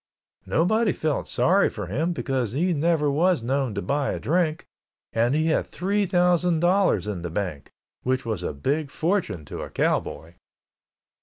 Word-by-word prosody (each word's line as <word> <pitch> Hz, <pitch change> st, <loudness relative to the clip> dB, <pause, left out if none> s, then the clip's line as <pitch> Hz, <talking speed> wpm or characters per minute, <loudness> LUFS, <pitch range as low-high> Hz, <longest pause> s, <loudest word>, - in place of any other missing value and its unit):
Nobody 215 Hz, +5 st, +2 dB
felt 155 Hz, -2 st, -2 dB
sorry 195 Hz, +3 st, +3 dB
for 105 Hz, -, -6 dB
him 145 Hz, -, -1 dB
because 130 Hz, -8 st, -2 dB
he 175 Hz, +6 st, +1 dB
never 150 Hz, -1 st, +2 dB
was 165 Hz, -1 st, +2 dB
known 130 Hz, -2 st, -1 dB
to 100 Hz, -, -3 dB
buy 140 Hz, -1 st, 0 dB
a -, -, -4 dB
drink, 160 Hz, 0 st, 0 dB, 0.5 s
and 120 Hz, +4 st, +2 dB
he 155 Hz, +1 st, +1 dB
had -, -, 0 dB
three 200 Hz, +2 st, -1 dB
thousand 175 Hz, -1 st, +2 dB
dollars 180 Hz, -, +2 dB
in 105 Hz, -4 st, -4 dB
the 85 Hz, -, -4 dB
bank, 85 Hz, -5 st, -4 dB, 0.3 s
which 130 Hz, 0 st, -1 dB
was 110 Hz, -6 st, -2 dB
a -, -, -2 dB
big 140 Hz, -, -1 dB
fortune 160 Hz, -, -1 dB
to -, -, -7 dB
a -, -, -6 dB
cowboy. 80 Hz, +2 st, -1 dB
150 Hz, 165 wpm, -25 LUFS, 115-175 Hz, 0.5 s, sorry